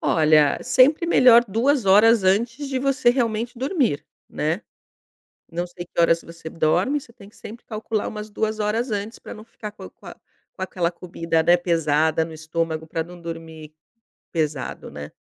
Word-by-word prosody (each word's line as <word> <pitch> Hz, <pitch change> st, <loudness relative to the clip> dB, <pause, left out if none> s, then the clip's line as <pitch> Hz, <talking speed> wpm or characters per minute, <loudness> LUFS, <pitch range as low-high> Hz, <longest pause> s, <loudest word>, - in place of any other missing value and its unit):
Olha, 155 Hz, -2 st, +3 dB
sempre 265 Hz, +6 st, +4 dB
melhor 245 Hz, -7 st, +6 dB
2 240 Hz, +4 st, +1 dB
horas 215 Hz, +2 st, +6 dB
antes 235 Hz, +9 st, 0 dB
de 265 Hz, -1 st, -1 dB
você 260 Hz, -2 st, +2 dB
realmente 235 Hz, -1 st, -1 dB
dormir, 265 Hz, -, 0 dB, 0.2 s
né. 160 Hz, +6 st, -2 dB, 0.9 s
Não 175 Hz, +1 st, -2 dB
sei 175 Hz, 0 st, -9 dB
que 170 Hz, -, -7 dB
horas 165 Hz, 0 st, +3 dB
você 165 Hz, -1 st, -10 dB
dorme, 180 Hz, -, +1 dB
você 235 Hz, -, -17 dB
tem 200 Hz, -3 st, -15 dB
que -, -, -25 dB
sempre 225 Hz, +2 st, -11 dB
calcular 215 Hz, -1 st, -3 dB
umas 210 Hz, 0 st, -7 dB
2 220 Hz, +1 st, -2 dB
horas 225 Hz, +4 st, -1 dB
antes 210 Hz, +2 st, -4 dB
pra -, -, -9 dB
não 215 Hz, -, -11 dB
ficar 215 Hz, -2 st, -9 dB
com -, -, -11 dB
com -, -, -23 dB
a -, -, -9 dB, 0.4 s
com 190 Hz, -, -12 dB
aquela 180 Hz, -2 st, -1 dB
comida, 165 Hz, -2 st, -2 dB
né, 175 Hz, +2 st, +5 dB
pesada 160 Hz, -2 st, +1 dB
no 160 Hz, 0 st, -8 dB
estômago, 160 Hz, 0 st, -3 dB
pra 165 Hz, +1 st, -3 dB
não 175 Hz, +1 st, -13 dB
dormir 160 Hz, -2 st, -9 dB, 0.6 s
pesado, 155 Hz, -5 st, -3 dB
né. 75 Hz, 0 st, -8 dB
190 Hz, 175 wpm, -22 LUFS, 165-230 Hz, 0.9 s, melhor